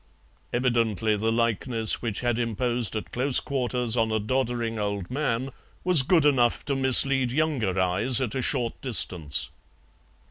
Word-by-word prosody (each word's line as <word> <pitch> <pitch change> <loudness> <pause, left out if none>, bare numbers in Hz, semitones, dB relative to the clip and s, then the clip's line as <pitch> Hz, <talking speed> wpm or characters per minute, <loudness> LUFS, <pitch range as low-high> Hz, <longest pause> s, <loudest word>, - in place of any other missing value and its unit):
Evidently 115 -4 0
the 110 +2 -1
likeness 115 0 0
which 115 -4 -1
had 120 -1 -1
imposed 120 0 -2
at 110 - -5
close 130 +1 +2
quarters 125 -4 -1
on 115 -2 0
a 110 - 0
doddering 120 0 -2
old 100 -2 -4
man 135 -2 -2 0.3
was 180 -5 +4
good 160 +3 +2
enough 125 -5 +2
to 140 - -1
mislead 130 -1 +3
younger 130 - -1
eyes 100 +7 +2
at 125 -5 -2
a 130 - -2
short 120 -3 -1
distance. 75 - +1
120 Hz, 145 wpm, -25 LUFS, 110-130 Hz, 0.3 s, was